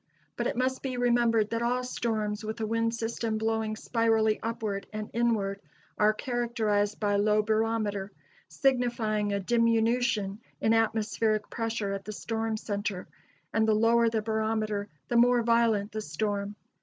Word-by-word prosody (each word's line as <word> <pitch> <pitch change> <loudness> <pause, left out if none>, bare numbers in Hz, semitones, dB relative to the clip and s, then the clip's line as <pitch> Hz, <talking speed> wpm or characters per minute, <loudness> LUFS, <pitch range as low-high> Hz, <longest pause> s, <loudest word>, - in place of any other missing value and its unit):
But - - -1
it - - -3
must 260 +1 0
be 260 -2 -3
remembered 235 -3 +2
that 230 0 -1
all 245 +1 0
storms 220 -4 -2
with 220 +2 -5
a 220 - -1
wind 230 +1 0
system 225 -1 -2
blowing 220 0 -1
spirally 225 -1 +1
upward 220 -3 -3
and 215 0 -5
inward 215 -4 0 0.3
are 210 0 +4
characterized 215 -3 -1
by 205 -1 +1
low 210 +1 +3
barometer, 215 -2 0 0.4
signifying 235 -6 0
a 200 - 0
diminution 230 -1 +1 0.2
in 220 - +2
atmospheric 220 -1 +1
pressure 225 -3 -2
at 195 0 -5
the 215 - -5
storm 225 +1 -2
center; 205 -3 -3 0.5
and 220 0 +2
the 215 - +4
lower 230 +1 +4
the 220 -1 -1
barometer, 215 -1 -1 0.2
the 240 - +1
more 240 0 +5
violent 225 -3 +2
the 215 - -4
storm. 205 +4 -3
220 Hz, 150 wpm, -28 LUFS, 210-230 Hz, 0.5 s, more